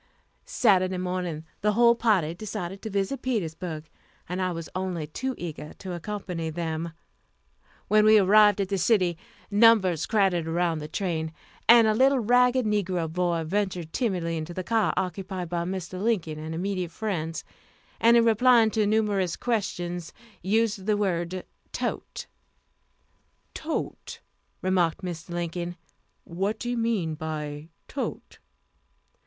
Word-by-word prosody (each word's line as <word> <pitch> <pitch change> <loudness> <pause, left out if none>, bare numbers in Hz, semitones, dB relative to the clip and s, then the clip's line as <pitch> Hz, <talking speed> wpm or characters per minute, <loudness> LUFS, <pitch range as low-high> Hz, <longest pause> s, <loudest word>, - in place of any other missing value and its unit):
Saturday 190 - +3
morning 180 -3 -3 0.2
the 210 +1 +2
whole 235 +2 +6
party 205 -9 +2
decided 190 -1 -6
to 220 - -5
visit 200 +6 -1
Petersburg, 165 -9 -3 0.4
and 180 +2 -3
I 185 0 0
was 165 -1 -5
only 185 -4 -2
too 260 - -4
eager 155 -3 -7
to 185 -2 -7
accompany 175 -2 -4
them. 165 0 -3 0.9
When 215 0 +5
we 215 0 +7
arrived 210 +1 +6
at 195 -2 -1
the 195 -1 0
city, 180 -4 +3 0.4
numbers 205 -6 +5
crowded 190 -6 +2
around 165 -1 0
the 150 - -6
train, 160 -2 -2 0.4
and 235 -1 +9
a 215 - +3
little 265 +5 +4
ragged 250 +2 +3
negro 185 -6 -1
boy 175 -2 0
ventured 180 -2 -2
timidly 180 -9 -1
into 160 +2 -5
the 185 - -3
car 225 +3 +2
occupied 185 -1 -3
by 170 0 -1
Mr. 185 0 -4
Lincoln 180 -9 0
and 160 +1 -5
immediate 185 0 -2
friends, 170 -4 -3 0.6
and 235 +1 +6
in 230 - +5
replying 230 0 +5
to 215 -2 +1
numerous 205 -5 +1
questions, 180 -7 -3 0.3
used 210 0 0
the 210 -1 +3
word 185 -2 -1 0.3
"tote." - - -4 1.3
"Tote," 320 0 -4 0.4
remarked 185 -2 +1
Mr. 175 -1 -6
Lincoln; 175 0 -3 0.5
"what 195 +5 -2
do 240 - -3
you 245 - -1
mean 215 -9 0
by 150 -1 -5 0.2
tote?" 275 - -5
185 Hz, 135 wpm, -26 LUFS, 170-215 Hz, 1.3 s, and